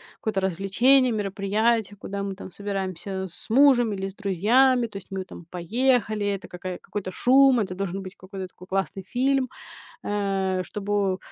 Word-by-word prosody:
какое-то 210 Hz, -3 st, -2 dB
развлечение, 225 Hz, +8 st, +3 dB
мероприятие, 205 Hz, +2 st, 0 dB
куда 200 Hz, 0 st, -5 dB
мы 195 Hz, -1 st, -4 dB
там 190 Hz, -, -9 dB
собираемся 190 Hz, -1 st, -4 dB
с -, -, -11 dB
мужем 245 Hz, -3 st, +5 dB
или 195 Hz, 0 st, -3 dB
с 195 Hz, -, -14 dB
друзьями, 235 Hz, +6 st, +3 dB
то 205 Hz, -, -8 dB
есть 195 Hz, -, -11 dB
мы 190 Hz, -1 st, -3 dB
там 175 Hz, -2 st, -12 dB
поехали, 215 Hz, +3 st, +1 dB
это 200 Hz, -1 st, -3 dB
какая 180 Hz, 0 st, -6 dB
какой-то 195 Hz, -3 st, -5 dB
шум, 260 Hz, +3 st, +5 dB
это 190 Hz, -3 st, -3 dB
должен 195 Hz, 0 st, -3 dB
быть 185 Hz, +1 st, -9 dB
какой-то 190 Hz, 0 st, -7 dB
такой 180 Hz, 0 st, -15 dB
классный 195 Hz, 0 st, -2 dB
фильм, 260 Hz, +1 st, +1 dB, 0.6 s
э, 195 Hz, -2 st, 0 dB
чтобы 200 Hz, -2 st, -1 dB
200 Hz, 160 wpm, -25 LUFS, 190-230 Hz, 0.6 s, мужем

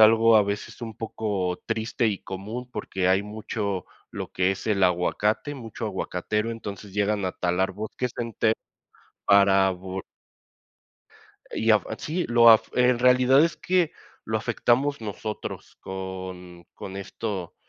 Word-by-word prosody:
algo 115 Hz, +1 st, +7 dB
a 105 Hz, -, +6 dB
veces 100 Hz, +4 st, -4 dB
un 110 Hz, -2 st, -6 dB
poco 100 Hz, -5 st, -2 dB
triste 110 Hz, +1 st, 0 dB
y 100 Hz, -, -2 dB
común, 110 Hz, +7 st, -6 dB
porque 95 Hz, -1 st, -1 dB
hay 95 Hz, +2 st, +3 dB
mucho 105 Hz, -2 st, -3 dB, 0.3 s
lo -, -, -5 dB
que 90 Hz, +1 st, +2 dB
es 95 Hz, -, -8 dB
el 100 Hz, -2 st, +2 dB
aguacate, 105 Hz, -, +1 dB
mucho 115 Hz, -6 st, -6 dB
aguacatero, 105 Hz, +2 st, -2 dB
entonces 105 Hz, -3 st, -7 dB
llegan 105 Hz, -1 st, +1 dB
a 90 Hz, -, -1 dB
talar 90 Hz, +2 st, 0 dB
bosques 110 Hz, +5 st, -4 dB
enteros 115 Hz, -1 st, +1 dB, 0.7 s
para 100 Hz, -1 st, +5 dB
vo 95 Hz, +1 st, -6 dB, 1.5 s
y 110 Hz, 0 st, +1 dB
afa 105 Hz, -, +2 dB
sí 170 Hz, +4 st, -2 dB
lo 120 Hz, -1 st, +7 dB
af 110 Hz, -, +6 dB
eh, 125 Hz, 0 st, +4 dB
en 125 Hz, -1 st, +3 dB
realidad 125 Hz, +3 st, +5 dB
es 170 Hz, -, -1 dB
que 180 Hz, -3 st, +1 dB, 0.3 s
lo 110 Hz, 0 st, -1 dB
afectamos 120 Hz, +5 st, +1 dB
nosotros 105 Hz, 0 st, -6 dB
con 95 Hz, -2 st, -7 dB
con 95 Hz, 0 st, -8 dB
esto, 100 Hz, -2 st, -5 dB
105 Hz, 140 wpm, -25 LUFS, 95-115 Hz, 1.5 s, algo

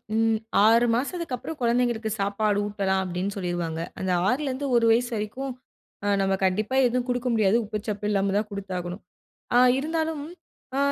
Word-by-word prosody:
ம், 225 Hz, 0 st, +2 dB, 0.3 s
ஆறு 230 Hz, +2 st, +5 dB
மாசதுக்கப்புறம் 310 Hz, +2 st, -3 dB
குழந்தைங்களுக்கு 235 Hz, -2 st, +1 dB
சாப்பாடு 205 Hz, +1 st, +1 dB
ஊட்டலாம் 195 Hz, -2 st, 0 dB
அப்படின்னு 185 Hz, +2 st, -3 dB
சொல்லிருவாங்க. 175 Hz, -4 st, -3 dB, 0.2 s
அந்த 190 Hz, -1 st, -1 dB, 0.2 s
ஆறுலேருந்து 270 Hz, +2 st, -1 dB
ஒரு 235 Hz, -1 st, +4 dB
வயசு 240 Hz, +2 st, +2 dB
வரைக்கும் 230 Hz, +6 st, -4 dB, 0.5 s
அ -, -, 0 dB
நம்ம 195 Hz, 0 st, +1 dB
கண்டிப்பா 210 Hz, +6 st, 0 dB
எதுவும் 250 Hz, 0 st, 0 dB
குடுக்க 245 Hz, 0 st, -1 dB
முடியாது, 215 Hz, -1 st, +3 dB
உப்பு 210 Hz, +1 st, -3 dB
சப்பு 210 Hz, -1 st, -2 dB
இல்லாம 195 Hz, -1 st, +1 dB
தான் 210 Hz, +1 st, 0 dB
குடுத்தாகணும். 185 Hz, -2 st, -5 dB, 0.5 s
அ -, -, +6 dB, 0.2 s
இருந்தாலும், 320 Hz, +1 st, -2 dB, 0.5 s
அ -, -, +1 dB
220 Hz, 150 wpm, -25 LUFS, 195-250 Hz, 0.5 s, அ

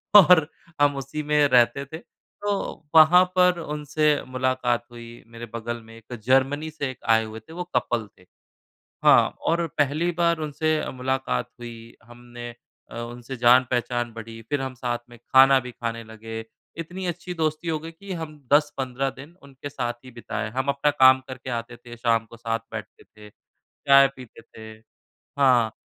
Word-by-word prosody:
और 180 Hz, -6 st, +8 dB, 0.3 s
हम 145 Hz, -1 st, +4 dB
उसी 140 Hz, +3 st, -5 dB
में 150 Hz, -1 st, +3 dB
रहते 125 Hz, +1 st, +3 dB
थे, 160 Hz, +4 st, -8 dB
तो 200 Hz, 0 st, -6 dB
वहाँ 160 Hz, +3 st, +8 dB
पर 180 Hz, -1 st, +4 dB
उनसे 150 Hz, -1 st, -2 dB, 0.2 s
मुलाकात 130 Hz, -2 st, 0 dB
हुई 120 Hz, 0 st, -11 dB
मेरे 115 Hz, 0 st, -9 dB
बगल 115 Hz, 0 st, -4 dB
में 115 Hz, 0 st, -14 dB
1 115 Hz, +2 st, -12 dB
जर्मनी 135 Hz, +5 st, +2 dB
से 145 Hz, -3 st, -4 dB
1 130 Hz, -, -14 dB
आए 110 Hz, 0 st, +5 dB
हुए 110 Hz, 0 st, -8 dB
थे, 110 Hz, +9 st, -15 dB
वो 180 Hz, -, -4 dB
कपल 120 Hz, -3 st, 0 dB
थे 90 Hz, -, -20 dB, 0.8 s
हाँ, -, -, +6 dB
और 170 Hz, +1 st, +1 dB
पहली 150 Hz, +5 st, +1 dB
बार 170 Hz, -1 st, +2 dB
उनसे 155 Hz, +1 st, -1 dB
मुलाकात 130 Hz, -, -2 dB
हुई 115 Hz, -1 st, -10 dB
हमने 120 Hz, +1 st, -10 dB, 0.4 s
अ, -, -, -10 dB
उनसे 120 Hz, +2 st, -7 dB
जान-पहचान 120 Hz, -1 st, +2 dB
बढ़ी 115 Hz, 0 st, -9 dB
फिर 145 Hz, -2 st, 0 dB
हम 130 Hz, -1 st, -5 dB
साथ 120 Hz, -1 st, -3 dB
में 120 Hz, -, -14 dB
खाना 135 Hz, +3 st, +5 dB
भी -, -, -6 dB
खाने 115 Hz, -1 st, -5 dB
लगे, 110 Hz, 0 st, -8 dB, 0.4 s
इतनी 180 Hz, +3 st, -6 dB
अच्छी 175 Hz, +1 st, -5 dB
दोस्ती 155 Hz, 0 st, -2 dB
हो 160 Hz, -1 st, 0 dB
गई 160 Hz, +2 st, -9 dB
कि 195 Hz, +4 st, -9 dB
हम 160 Hz, -3 st, -6 dB
10-15 135 Hz, -3 st, +1 dB
दिन 140 Hz, +5 st, -13 dB
उनके 140 Hz, 0 st, -10 dB
साथ 125 Hz, -4 st, -3 dB
ही 130 Hz, -, -11 dB
बिताए, 115 Hz, -2 st, -5 dB
हम 130 Hz, +4 st, -3 dB
अपना 140 Hz, +1 st, +2 dB
काम 130 Hz, -2 st, +6 dB
करके 130 Hz, 0 st, -7 dB
आते 120 Hz, 0 st, -4 dB
थे, 120 Hz, 0 st, -12 dB
शाम 115 Hz, -1 st, +1 dB
को 115 Hz, -, -11 dB
साथ 115 Hz, 0 st, -2 dB
बैठते -, -, -8 dB
थे, 105 Hz, -1 st, -16 dB, 0.6 s
चाय 140 Hz, 0 st, +8 dB
पीते 125 Hz, -3 st, -13 dB
थे 110 Hz, -1 st, -12 dB, 0.7 s
हाँ, 125 Hz, -5 st, +4 dB
130 Hz, 170 wpm, -24 LUFS, 120-150 Hz, 0.8 s, और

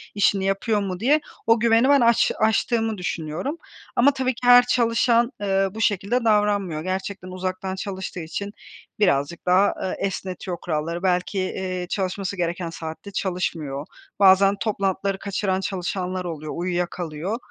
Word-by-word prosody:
işini 200 Hz, -1 st, +2 dB
yapıyor 195 Hz, +3 st, +1 dB
mu?" 185 Hz, -2 st, -4 dB
diye 280 Hz, +8 st, +3 dB, 0.3 s
o 225 Hz, 0 st, +5 dB
güveni 230 Hz, +3 st, +4 dB
ben 285 Hz, -2 st, +6 dB
aç 235 Hz, -1 st, +4 dB
aştığımı 220 Hz, 0 st, +1 dB
düşünüyorum 175 Hz, -, -3 dB, 0.4 s
ama 265 Hz, +4 st, +5 dB
tabii 260 Hz, -1 st, 0 dB
ki 245 Hz, +1 st, -4 dB
her 245 Hz, 0 st, +8 dB
çalışan, 235 Hz, 0 st, +2 dB
eee, 195 Hz, -1 st, +2 dB
bu 220 Hz, -, -5 dB
şekilde 215 Hz, +4 st, +1 dB
davranmıyor. 205 Hz, -7 st, +2 dB
Gerçekten 185 Hz, +1 st, -4 dB
uzaktan 185 Hz, +1 st, -4 dB
çalıştığı 190 Hz, -2 st, -5 dB
için 200 Hz, +5 st, -5 dB, 0.5 s
birazcık 170 Hz, -5 st, +1 dB
daha, 185 Hz, +3 st, +4 dB
eee, 190 Hz, -, -2 dB
esnetiyor 185 Hz, -1 st, -5 dB
kuralları. 165 Hz, +2 st, -3 dB
Belki, 180 Hz, +1 st, 0 dB
eee, 185 Hz, -1 st, -3 dB
çalışması 190 Hz, 0 st, -2 dB
gereken 170 Hz, 0 st, -2 dB
saatte 165 Hz, +4 st, -7 dB
çalışmıyor. 165 Hz, -7 st, -3 dB, 0.3 s
Bazen 195 Hz, 0 st, +6 dB
toplantıları 195 Hz, -2 st, -1 dB
kaçıran 195 Hz, -1 st, -1 dB
çalışanlar 185 Hz, -1 st, -3 dB
oluyor, 155 Hz, -3 st, -5 dB
uyuyakalıyor. 175 Hz, +1 st, -3 dB
190 Hz, 135 wpm, -23 LUFS, 180-215 Hz, 0.5 s, her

